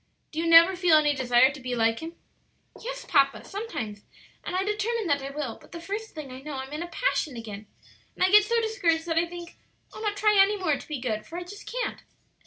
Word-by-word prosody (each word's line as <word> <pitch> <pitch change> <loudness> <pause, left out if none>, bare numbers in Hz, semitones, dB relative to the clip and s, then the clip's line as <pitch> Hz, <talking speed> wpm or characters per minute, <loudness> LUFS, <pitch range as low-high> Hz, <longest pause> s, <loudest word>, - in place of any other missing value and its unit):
Do 315 - -4
you 335 - 0
never 335 +3 +8
feel 345 -3 +5
any 295 -1 +3
desire 260 0 +4
to 285 - -10
be 250 -1 -4
like 225 -1 +1
Him?" 330 +1 -8 0.7
"Yes, - - -6
papa, 275 -3 +3
sometimes; 235 - -6 0.4
and - - -4
I 375 - +1
determine 425 +2 -1
that 285 -4 +1
I 270 - -5
will; 275 -5 -5
but - - -18
the 335 - -6
first 410 +5 -6
thing 300 -4 -7
I 255 - -8
know 295 0 -6
I'm 265 +2 -6
in 305 - -4
a 345 - -4
passion 340 - -1
again; 210 -2 -8 0.5
and - - 0
I 370 - +3
get 420 0 +8
so 465 +3 +1
discouraged 355 -8 0
that 330 -1 +1
I 340 - 0
think 345 0 -10 0.4
I'll - - -9
not 415 -2 -2
try 420 -1 +4
any 410 +2 +3
more 340 -7 +1
to - - -10
be 300 -3 -4
good; 215 -4 -3
for 340 - -7
I 355 - -4
just 405 +4 -10
can't." - - -3
330 Hz, 240 wpm, -26 LUFS, 270-405 Hz, 0.7 s, never